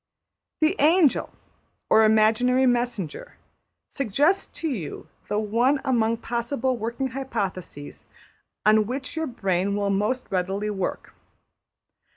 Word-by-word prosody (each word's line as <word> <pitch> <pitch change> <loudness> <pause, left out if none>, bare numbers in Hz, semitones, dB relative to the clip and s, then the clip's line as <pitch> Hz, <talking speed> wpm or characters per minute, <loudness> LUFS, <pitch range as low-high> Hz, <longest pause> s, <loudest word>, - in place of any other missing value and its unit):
The 315 +5 +3
angel 315 -1 +3 0.6
(or 220 - +5
imaginary 220 +4 +3
messenger) 240 - -1 0.5
suggests 290 - +1
to 330 - -1
you 215 - -5 0.2
the 210 - 0
one 235 +7 +2
among 230 -3 +1
possible 240 +3 -2
working 235 +4 -3
hypotheses 200 - -5 0.6
on 215 0 +4
which 265 +5 -5
your 320 0 -2
brain 195 -5 -1
will 200 -1 0
most 210 +6 0
readily 195 +3 -1
work. 190 -3 -4
230 Hz, 110 wpm, -24 LUFS, 205-265 Hz, 0.6 s, or